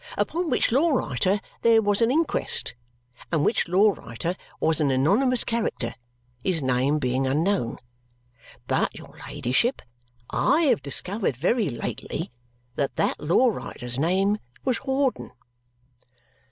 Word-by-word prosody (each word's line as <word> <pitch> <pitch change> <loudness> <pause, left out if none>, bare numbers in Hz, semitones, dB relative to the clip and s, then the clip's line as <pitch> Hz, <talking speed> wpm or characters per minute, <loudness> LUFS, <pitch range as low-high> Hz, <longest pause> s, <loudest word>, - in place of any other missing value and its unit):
Upon 345 0 -1
which - - +2
law 290 +8 +3
writer 190 - +1 0.2
there 230 -1 +5
was 205 0 +1
an 230 - +4
inquest, 315 - 0 0.6
and 155 -3 +2
which 225 - +1
law 195 +5 +4
writer 165 - -5 0.2
was 160 0 +1
an 145 - +2
anonymous 205 - +3
character, 225 - -2 0.5
his 180 -3 +1
name 130 +3 +2
being 130 -1 0
unknown. 155 - 0 0.9
But, - - 0
your - - -13
ladyship, 180 - 0 0.5
I 325 - +3
have 275 - +3
discovered 180 - -2
very 200 - +1
lately 120 -1 -5 0.5
that 140 - -1
that - - 0
law 175 +12 +3
writer's 125 - -4
name 190 +6 +2 0.3
was 255 -3 +1
Hawdon." 265 - -1
185 Hz, 125 wpm, -25 LUFS, -, 0.9 s, there